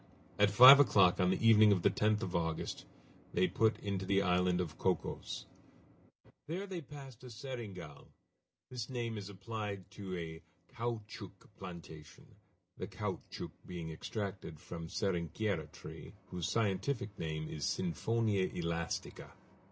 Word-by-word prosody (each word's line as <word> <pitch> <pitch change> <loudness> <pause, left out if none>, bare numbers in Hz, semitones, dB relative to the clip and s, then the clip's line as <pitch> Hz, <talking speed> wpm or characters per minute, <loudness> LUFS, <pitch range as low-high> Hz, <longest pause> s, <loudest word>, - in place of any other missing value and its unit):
At 100 0 +6
five 125 +7 +11
o'clock 100 -9 +5
on 90 -1 +4
the 115 +4 +2
evening 110 -1 +8
of 90 -4 +2
the - - +5
10th 105 +1 +2
of 90 - -3
August 80 -1 -2 0.5
they 90 +1 +4
put 110 +1 +2
into 100 -2 -2
the 100 +1 +2
island 90 -1 +2
of 85 -4 -3
Cocos. - - -1 1.0
They 180 +6 -3
there 185 -4 -5
passed 135 -4 -11
a - - -8
"seringal." 110 - -7 0.6
This 125 -2 -4
name 120 -3 -3
is 100 -2 -6
applied 100 -1 -5
to 95 -3 -5
a 80 -1 -6 0.3
caoutchouc 115 -2 -5
plantation, 85 -5 -10 0.5
the 95 - -3
caoutchouc 100 -1 -5 0.2
being 85 -3 -5
extracted 95 -1 -5
from 85 +1 -7
the - - -9
"seringueira" 90 -3 -1
tree, - - -10 0.2
whose 90 0 -2
scientific 105 +2 -1
name 80 -1 -3
is 75 -2 -5
_siphonia 100 +3 0
elastica. 85 -1 -3
100 Hz, 135 wpm, -34 LUFS, 90-110 Hz, 1.0 s, five